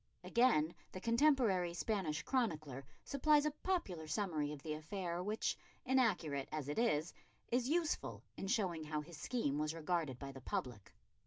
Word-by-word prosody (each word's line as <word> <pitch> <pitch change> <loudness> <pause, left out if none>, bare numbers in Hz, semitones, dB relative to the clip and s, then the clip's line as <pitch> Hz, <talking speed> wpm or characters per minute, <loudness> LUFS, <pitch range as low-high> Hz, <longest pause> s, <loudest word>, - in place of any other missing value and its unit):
Again 175 -10 +4 0.2
the 185 - -4
contemporary 230 - +3
Spanish 175 -7 -1
chronicler 155 - -1 0.2
supplies 295 +1 +4
a 300 - +2
popular 280 - -2
summary 155 -4 0
of 145 -2 -8
the 155 - -2
affair 170 +3 -3
which, 210 +4 0 0.3
inaccurate 215 - +2
as 155 -3 -3
it 145 - -1
is, 175 -9 +2 0.4
is 245 +1 +2
useful 330 0 0
in 195 - -4
showing 190 -7 +1
how 150 0 -1
his 160 +1 -10
scheme 155 - -1
was 155 +1 -1
regarded 160 -5 -1
by 135 +1 -6
the 135 -1 -10
public. 120 -4 -4
175 Hz, 155 wpm, -38 LUFS, 150-235 Hz, 0.4 s, Again